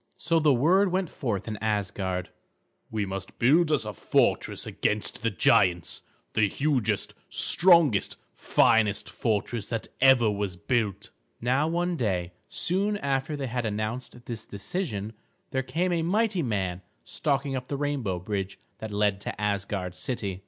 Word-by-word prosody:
So 165 +2 +1
the 155 -2 +4
word 175 +10 +4
went 185 -2 -1
forth 115 -8 -3
in 110 -1 -4
Asgard: 95 -3 -2 0.6
"We 105 -2 -1
must 95 0 -6
build 155 +7 +4
us 135 -8 +1
a 105 - -4
fortress - - +1
against 105 0 -1
the 115 - +1
giants; 90 -2 +2 0.3
the 110 -2 +3
hugest, 135 0 0 0.2
strongest, 170 - +4 0.2
finest 105 -4 +2
fortress 105 +2 -2
that 115 -1 -3
ever 125 -4 +6
was 100 -3 -3
built." 105 -1 -1 0.3
Now 130 +6 +1
one 175 +1 0
day, 90 - -1 0.2
soon 200 +4 +1
after 140 -1 -1
they 140 -2 -3
had 125 -1 -2
announced 115 +3 -4
this 115 -2 -5
decision, 105 - -4 0.4
there 130 - 0
came 165 +8 -1
a 170 -1 +1
mighty 200 +2 +1
man 95 - -2 0.2
stalking 140 -1 -1
up 125 -1 -4
the 140 - -3
rainbow 135 -10 -1
bridge 95 +1 -4 0.2
that 110 - -5
led 105 -1 0
to - - -5
Asgard 100 -3 -2
city. 100 -3 -4
115 Hz, 145 wpm, -27 LUFS, 100-145 Hz, 0.6 s, ever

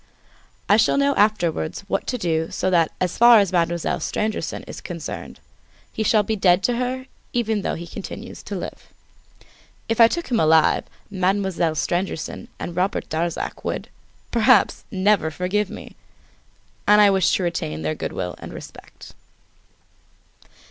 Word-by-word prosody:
I 205 - +5
shall 225 - +3
know 280 0 +3
afterwards 185 - +1
what 200 - -3
to 250 - -1
do 165 -5 -1
so 185 - -1
that 165 -3 +3
as 180 -2 -2
far 235 0 +8
as 200 -4 +3
Mademoiselle 170 -1 0
Stangerson 215 0 -3
is - - -9
concerned - - -7 0.5
he - - -3
shall 215 0 +3
be 220 +2 -1
dead 190 -2 +3
to 240 +2 +1
her 255 +1 -2 0.3
even 225 -3 0
though - - -2
he 170 - -7
continues 170 - -8
to - - -6
live. - - -7 1.0
If 225 +1 +2
I 230 - +10
took 340 +2 -4
him 235 - +2
alive, 160 0 +4 0.3
Mademoiselle 190 -3 0
Stangerson 175 +1 -2
and 170 - -5
Robert 185 +3 -1
Darzac 165 +2 -3
would, - - -4 0.4
perhaps, 235 -2 +3
never 190 -3 +2
forgive 185 +5 -1
me! - - -10 0.9
And 210 0 +7
I 205 -1 +7
wish 190 -3 +3
to 190 - -1
retain 80 - -3
their 80 0 0
good - - -5
will 90 -1 -4
and - - -9
respect. - - -12
190 Hz, 155 wpm, -22 LUFS, 170-220 Hz, 1.0 s, I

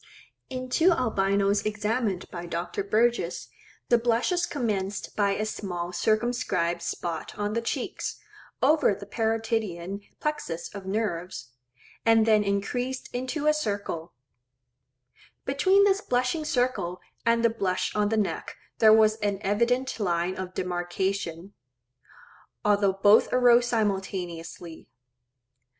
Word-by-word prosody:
In 255 -1 -5
two 325 +8 +4
Albinos 200 - +1
examined 210 -1 -1
by 175 -1 -6
Dr. 170 +3 -3
Burgess, 235 +4 0 0.4
the 240 - +5
blushes 245 +10 +1
commenced 205 -7 -3
by 200 -1 +2
a 215 - -1
small 180 -5 -4
circumscribed 215 -5 0
spot 170 -1 -4
on 205 0 -2
the 230 - 0
cheeks, 230 - -3 0.4
over 300 -9 +4
the 200 +1 -9
parotidean 220 -4 -2 0.2
plexus 175 - -3
of 200 -2 -8
nerves, 180 - -3 0.5
and 225 -1 +5
then 215 -2 +4
increased 245 +6 -2
into 260 +5 -3
a 305 - +5
circle; 200 - -3 1.3
between 375 +9 +4
this 400 0 +3
blushing 255 +4 0
circle 245 -10 0 0.2
and 230 0 +3
the 230 - +4
blush 190 -5 -1
on 210 -1 +2
the 220 - 0
neck 210 - -2 0.2
there 220 -1 +7
was 215 0 +5
an 205 -2 -1
evident 235 +6 +1
line 175 -2 0
of 185 -1 -6
demarcation; 180 0 -3 1.1
although 205 -2 +3
both 205 +3 +5
arose 245 -1 +5
simultaneously. 185 -6 -3
210 Hz, 120 wpm, -27 LUFS, 190-240 Hz, 1.3 s, there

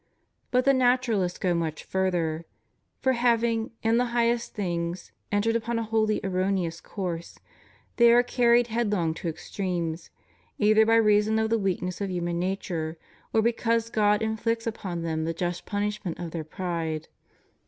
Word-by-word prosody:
But 250 0 +2
the 275 - +6
Naturalists 245 -8 +2
go 180 -2 +1
much 160 -2 -2
further; 170 -4 -1 0.6
for 260 - +3
having, 235 -2 +1
in 225 +1 +3
the 250 - +3
highest 235 0 +1
things, 175 -3 -3 0.2
entered 210 +2 +1
upon 230 +1 -1
a 230 - 0
wholly 220 -1 +1
erroneous 185 -3 -1
course, 175 -4 -5 0.6
they 235 -1 +7
are 240 +1 +6
carried 240 -1 +3
headlong 210 -8 0
to 165 - -6
extremes, 170 -1 -4 0.5
either 215 +1 +4
by 225 - +5
reason 215 -1 +4
of 220 0 0
the 230 - +3
weakness 185 -1 -2
of 200 - -1
human 175 -1 -2
nature, 175 -3 -3 0.3
or 220 - +3
because 230 0 +1
God 210 0 +3
inflicts 225 +1 -1
upon 185 -7 -4
them 160 -1 -1
the 165 +1 -2
just 175 +1 -3
punishment 205 -3 -2
of 170 -2 -6
their 165 -1 -4
pride. 160 -2 -3
205 Hz, 155 wpm, -27 LUFS, 175-230 Hz, 0.6 s, they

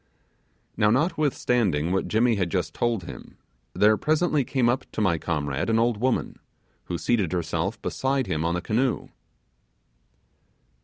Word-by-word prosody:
Now, 105 - +4
notwithstanding 125 - +1
what 95 - 0
Jimmy 115 +2 +2
had 95 -5 0
just - - -2
told 115 -5 -1
him, - - -10 0.4
there 105 +1 +4
presently 155 0 +1
came 130 -1 +1
up 120 +2 -1
to - - -4
my 90 -6 +2
comrade 75 0 -2
an 115 - +3
old 115 -1 +2
woman, 125 +3 -1 0.5
who 85 - -3
seated 100 -4 0
herself 85 +4 -2
beside 135 0 0
him 80 -5 -2
on 85 +1 0
the 90 - -2
canoe. 125 +4 0
110 Hz, 145 wpm, -25 LUFS, 85-125 Hz, 0.5 s, Now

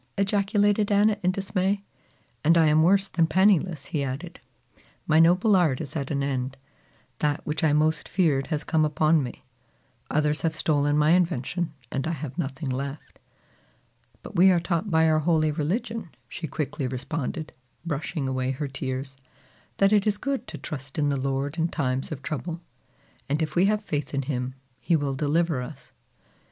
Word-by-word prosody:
ejaculated 205 +1 +2
Anna 205 +1 +4
in 180 - +2
dismay. 195 +1 -1 0.6
"And 165 +3 +5
I 165 - +5
am 155 +1 +4
worse 195 +4 +4
than 165 -4 +1
penniless," 180 -4 +2
he 145 -3 +1
added. 140 +6 -5 0.7
"My 155 0 +4
noble 180 +6 +5
art 160 -8 +3
is 145 -1 -7
at 140 -3 -3
an 140 -2 -1
end. 135 -1 -2 0.6
That 150 -1 0
which 150 +1 -2
I 155 - +4
most 155 +1 +1
feared 150 -8 +1
has 155 -3 -2
come 160 +1 +1
upon 155 +1 +3
me. 125 -3 -7 0.6
Others 150 0 +1
have 160 -2 0
stolen 145 -1 +1
my 150 +1 +4
invention 170 -1 0 0.2
and 135 +3 -2
I 170 - -1
have 150 +1 -6
nothing 135 -2 -3
left." 140 +3 -5 1.0
"But - - -10
we 185 +2 +7
are 180 -2 +4
taught 170 +3 -1
by 160 -2 +4
our 155 0 +3
holy 155 -1 +2
religion," 205 +7 -2 0.2
she 165 - -6
quickly 145 -1 -3
responded, 150 +4 -4 0.3
brushing 150 -2 -3
away 130 -1 -1
her 135 +2 -2
tears, 135 0 -4 0.6
"that 195 +1 +4
it 210 0 +3
is 205 -1 +2
good 275 +3 -3
to - - -6
trust 135 -3 -7
in 145 -1 +2
the 140 - +1
Lord 140 +3 -2
in 165 - +2
times 135 -5 -2
of 145 -2 -6
trouble, 165 +2 -4 0.7
and 145 +2 +1
if 155 -1 -2
we 180 +2 +4
have 210 +1 +1
faith 145 -1 -3
in 140 - 0
him, 125 -1 -3 0.2
he 170 - +1
will 145 -3 0
deliver 150 +1 +1
us." 135 +2 -9
155 Hz, 175 wpm, -26 LUFS, 140-175 Hz, 1.0 s, we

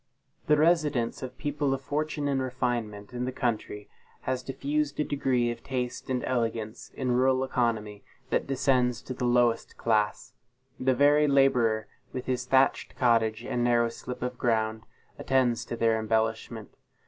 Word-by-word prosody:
The 150 - +5
residence 150 -7 +2
of 130 0 -7
people 145 -2 -1
of 135 - -8
fortune 150 +1 -2
and 135 -2 +1
refinement 120 -5 -3
in 125 0 -2
the 130 - -2
country, 110 -4 -3 0.3
has 130 -1 -2
diffused 140 +3 -2
a - - +3
degree 130 -5 0
of 120 - -8
taste 125 -2 -4
and 125 -1 -1
elegance 115 -3 -2
in 130 -2 -1
rural 130 +1 +3
economy 110 -5 -1 0.3
that - - +1
descends 130 -3 +1
to 130 - -5
the 125 - -3
lowest 120 -1 +2
class. 110 -2 0 0.5
The 130 0 +2
very 145 +2 +5
laborer, 125 -6 +3 0.3
with 130 - -4
his 130 -1 -1
thatched 135 0 +2
cottage 115 -3 +2
and 120 - -1
narrow 120 -1 +3
slip 125 +1 -7
of 125 0 -4
ground, 110 -1 0 0.3
attends 125 -3 +1
to - - -4
their 115 -1 +2
embellishment. 110 0 -2
125 Hz, 155 wpm, -28 LUFS, 115-135 Hz, 0.5 s, The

